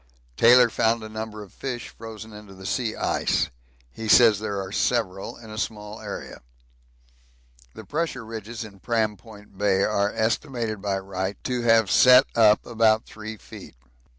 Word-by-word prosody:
Taylor 120 - +7
found 115 0 +1
a 110 - -8
number 110 -1 -6
of 100 - -16
fish 125 -3 -5
frozen 110 -1 -10
into 105 -2 -12
the 95 0 -12
sea 110 +2 -2
ice - - 0 0.4
he 110 - -7
says 110 -2 +6
there 105 -2 -3
are 95 0 -6
several 100 -4 -1
in 110 -2 -12
a 110 - -6
small 105 -1 -5
area. 105 -2 -8 1.3
The - - -10
pressure 150 -7 -3
ridges 115 +1 -7
in 100 -3 -12
Pram 110 0 0
Point 105 -1 -16
Bay 100 -1 +2
are 100 -1 +1
estimated 110 -1 -2
by 100 -1 -1
Wright 95 0 -4
to 125 -1 -2
have 115 -3 +3
set 125 +1 +7
up 110 -2 +5
about 110 -1 +2
3 110 0 -9
feet. - - -12
110 Hz, 160 wpm, -24 LUFS, 105-115 Hz, 1.3 s, Taylor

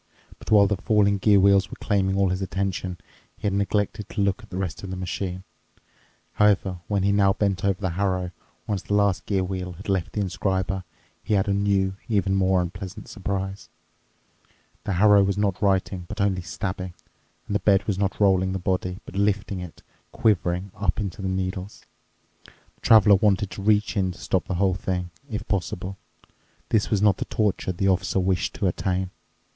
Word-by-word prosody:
But - - -11
while 105 -2 +7
the 100 0 0
falling 100 0 +2
gear 100 0 +5
wheels 100 0 +4
were - - -9
claiming 95 -2 +1
all 100 -1 +3
his 95 +1 -2
attention, 95 -1 -2 0.4
he - - -27
had 100 - +1
neglected 100 +1 -1
to 105 - -2
look 100 -1 +1
at - - -15
the 90 - -6
rest 95 -4 -3
of 95 - -7
the 95 - -4
machine. 90 0 -4 0.9
However, 100 -3 +2
when 100 -2 0
he 100 - +3
now 100 -1 +4
bent 100 -3 -1
over 100 -1 +1
the 95 -3 -1
harrow, 90 0 -1 0.3
once 100 -3 -2
the 105 - -2
last 100 -2 +1
gear 95 -2 +1
wheel 90 -1 -4
had 100 +5 -11
left 95 -4 -1
the - - -2
inscriber, 95 0 -1 0.4
he 105 - +1
had 95 0 +1
a 100 - +2
new, 100 -1 +1
even 100 -3 +1
more 95 -1 +3
unpleasant 90 +2 -7
surprise. 95 -1 -4 1.2
The 100 - -1
harrow 100 +2 +6
was 100 0 0
not 100 -2 0
writing 95 -2 +1
but 105 +3 -7
only 100 -2 +1
stabbing, 95 0 -5 0.5
and - - -5
the 100 - +2
bed 100 -3 +3
was 100 -3 -1
not 100 -1 -1
rolling 95 -2 +3
the - - -1
body, 90 0 -1
but - - -11
lifting 100 -1 0
it, 90 -3 -9 0.3
quivering, 95 -3 +1
up 100 -1 -1
into 100 -2 -4
the 95 - -2
needles. 95 +1 -4 0.6
The - - -24
Traveler 105 -3 +7
wanted 100 -1 +2
to 95 - -7
reach 105 +1 +2
in 95 -3 0
to - - -15
stop 95 - -1
the 95 - -2
whole 95 +1 +2
thing, 90 -1 -3 0.2
if 105 -3 -4
possible. 95 0 -3 0.7
This 110 -2 +2
was 105 -2 +1
not 105 -3 +4
the - - -3
torture 105 -3 0
the 95 +2 -1
Officer 95 0 +1
wished 95 0 0
to 105 - -2
attain. 95 0 -1
95 Hz, 190 wpm, -25 LUFS, 95-100 Hz, 1.2 s, while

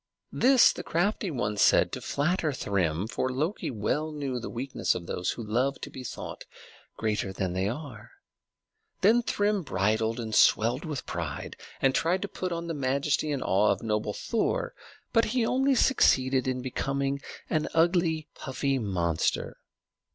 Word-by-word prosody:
This 260 0 +6
the - - -6
crafty 195 +3 0
one 105 -8 -2
said - - +4
to - - -5
flatter 155 +2 0
Thrym, 95 - -1
for 130 +3 -2
Loki 155 +10 -2
well 140 +7 -1
knew 140 -4 -3
the - - -6
weakness 130 +3 -1
of 85 - -5
those 90 +2 -2
who 120 - -7
love 125 +6 0
to - - -6
be 130 - -8
thought - - -7 0.5
greater 105 -3 -1
than 95 -2 -2
they 95 +2 0
are. 120 -3 -7 0.9
Then 225 +5 +5
Thrym 205 -3 0
bridled 110 - 0
and 110 -2 -4
swelled 120 +8 +4
with 150 -4 -4
pride, 80 -5 -5 0.3
and 135 -1 +4
tried 180 +7 +1
to - - -2
put 185 -2 -4
on 170 0 -3
the 170 - -3
majesty 140 +2 0
and 140 -2 -2
awe 100 +3 +3
of 100 +1 -2
noble 105 -1 -1
Thor; 350 - -1 0.4
but 230 -1 +4
he 240 +1 0
only 265 +3 +2
succeeded 130 - +3
in 130 -1 -1
becoming 135 +2 -2 0.3
an 155 -1 0
ugly, 165 -2 +2
puffy 135 +1 -2
monster. 85 -7 -1
135 Hz, 160 wpm, -28 LUFS, 110-165 Hz, 0.9 s, This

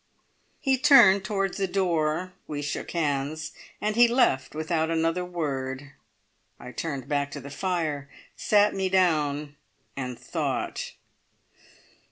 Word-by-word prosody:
He 265 -2 +1
turned 235 -9 +7
towards 195 -2 -1
the 195 - +1
door; 175 -2 0
we 145 -1 -4
shook 145 - -4
hands, 150 -1 -2 0.3
and 215 0 -1
he 240 +1 +7
left 230 - +2
without 160 +1 0
another 165 +2 0
word. 140 -5 -4 0.7
I 125 - -9
turned 140 -3 -4
back 145 -1 0
to - - -5
the 140 - -9
fire, 155 -4 -2 0.3
sat 210 0 +3
me 190 -1 -1
down, 150 -6 +1 0.4
and 125 -3 -4
thought. - - -3
160 Hz, 125 wpm, -26 LUFS, 145-190 Hz, 0.7 s, turned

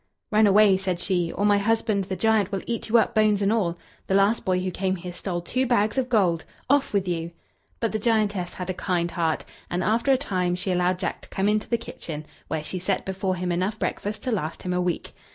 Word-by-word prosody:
"Run 215 0 +5
away," 200 -1 +6
said 185 -2 -2
she, 175 -3 0
"or 205 - -1
my 205 -1 +4
husband 215 -1 +1
the 190 0 -3
giant 220 -2 +2
will 195 -2 -2
eat 230 -1 -3
you 235 - +5
up, 225 - +2
bones 215 -2 +3
and 200 +1 +2
all. 175 -7 0 0.3
The 190 - +1
last 200 +3 +3
boy 185 -1 +1
who 185 0 -2
came 190 +1 -1
here 180 0 -7
stole 175 -1 -3
two 255 +9 -1
bags 215 -3 +2
of 260 -2 0
gold 185 -8 +2 0.3
off 285 -1 +3
with 195 -2 0
you!" 170 -1 -2 0.5
But 230 - 0
the 215 - -1
giantess 210 -5 0
had 185 0 -3
a - - -3
kind 175 -2 -1
heart, 165 -3 -1 0.2
and 175 +1 -1
after 230 +7 +2
a 265 - +5
time 185 -9 -1
she 180 +1 -2
allowed 180 0 +2
Jack 185 - -3
to - - -14
come 195 +1 0
into 210 0 +1
the 235 - +2
kitchen, 155 -9 -7 0.2
where 155 0 -2
she 185 +4 -4
set 185 +2 -1
before 190 0 -1
him 180 0 -2
enough 185 +5 -1
breakfast 210 -1 -3
to 255 - -1
last 165 -7 -3
him 180 - -2
a 180 - +1
week. 180 -1 -2
195 Hz, 240 wpm, -25 LUFS, 180-215 Hz, 0.5 s, away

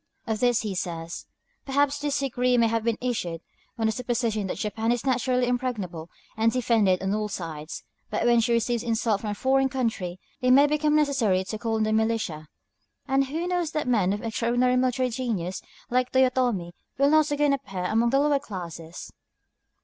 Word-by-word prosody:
Of 220 -2 -2
this 245 -1 +3
he 210 -3 -3
says: 170 -2 -5 0.4
"Perhaps 285 +1 +1
this 290 -1 -1
decree 250 -2 +1
may 235 - +4
have 225 0 0
been 230 -1 0
issued 180 -10 -3 0.4
on 225 - 0
the 220 - +3
supposition 235 -4 -1
that - - -4
Japan 220 +3 -1
is 240 +1 -1
naturally 255 -1 +1
impregnable 215 -10 -3 0.3
and 225 +1 +2
defended 225 -7 +2
on 190 +1 0
all 215 0 -1
sides. 160 -5 -6 0.3
But - - -1
when 240 -1 +5
she 235 +1 +1
receives 235 0 +1
insult 225 -3 0
from 215 - -3
a 205 - -2
foreign 265 +4 +2
country, 220 -9 -2 0.2
it 255 - +2
may 275 +3 +7
become 300 +1 +1
necessary 265 -11 +2
to 215 +3 -5
call 225 -1 -1
on 220 - +1
the 215 0 +1
militia. 220 -9 -1 0.6
And 270 0 +2
who 320 +5 -3
knows 355 -3 -1
that 305 -3 -1
men 210 -7 +2
of 205 +3 -3
extraordinary 240 +2 +1
military 255 0 +1
genius, 215 -8 -3 0.3
like 250 0 +1
Toyotomi, 250 -9 +2 0.3
will 280 +1 +4
not 310 -1 +4
again 290 -1 +2
appear 195 -10 -4
among 225 +5 +2
the 270 +3 +3
lower 290 -1 +3
classes?" 170 - -8
235 Hz, 185 wpm, -26 LUFS, 210-260 Hz, 0.6 s, may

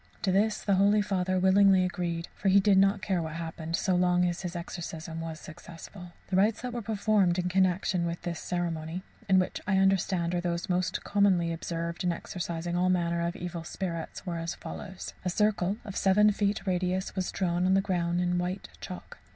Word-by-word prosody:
To 190 - +2
this 210 +3 +1
the 200 - +2
holy 205 +2 +4
Father 185 -2 0
willingly 190 0 +5
agreed, 170 -2 -3
for 195 - 0
he 195 +1 +6
did 195 -1 +4
not 195 +1 +3
care 190 -4 0
what 160 -1 -5
happened 165 0 -4
so 185 0 +1
long 180 0 +3
as 175 0 -1
his 180 -1 -5
exorcism 165 -1 -6
was 165 -1 -6
successful. 175 +2 -11 0.2
The 185 - +1
rites 210 +4 +2
that 250 -1 -4
were 240 - -3
performed 205 -4 +2
in 180 0 0
connexion 185 -1 +1
with 170 0 -3
this 170 -2 -3
ceremony 170 0 -3 0.3
(and 190 -1 +6
which 185 - -2
I 195 -2 +3
understand 190 -2 +2
are 175 - 0
those 175 +1 -2
most 180 0 0
commonly 190 -5 +2
observed 170 +1 -4
in 180 - +2
exorcizing 170 0 -4
all 180 +1 +2
manner 170 -2 +1
of 170 +1 -2
evil 175 -1 -5
spirits) 170 -1 -5
were 170 -2 -3
as 165 0 -3
follows: 185 +1 -8
A 180 - 0
circle 200 0 +1
of 200 - -7
seven 210 +2 +4
feet 200 0 -1
radius 185 0 -1
was 185 -2 -2
drawn 180 -1 0
on 190 - +4
the - - +5
ground 175 -3 0
in 180 0 +1
white 180 +2 -3
chalk. 180 - -9
180 Hz, 200 wpm, -29 LUFS, 170-195 Hz, 0.3 s, he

